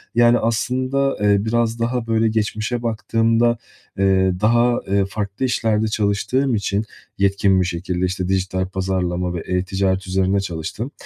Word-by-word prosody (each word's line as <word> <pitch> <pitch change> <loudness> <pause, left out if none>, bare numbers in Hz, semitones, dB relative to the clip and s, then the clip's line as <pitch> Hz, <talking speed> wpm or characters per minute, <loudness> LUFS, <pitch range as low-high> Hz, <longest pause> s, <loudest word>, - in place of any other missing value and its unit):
yani, 120 0 +5
aslında, 130 +4 0
eee, 100 0 +3
biraz 115 0 0
daha 120 0 -1
böyle 115 0 +2
geçmişe 110 +2 -1
baktığımda, 115 +1 +1 0.4
ııı, 95 -1 +2
daha, 120 +3 +3 0.2
ııı, 100 -1 +2
farklı 100 +4 -3
işlerde 110 -3 +1
çalıştığım 110 +5 0
için 100 0 -1 0.3
yetkin 100 -1 +2
bir 90 - +1
şekilde, 90 +1 -2
işte, 90 0 -2
dijital 95 -1 -1
pazarlama 90 -2 -2
ve - - -3
e-ticaret 95 +1 -1
üzerinde 95 +1 +1
çalıştım. 95 - -5
100 Hz, 135 wpm, -20 LUFS, 95-115 Hz, 0.4 s, yani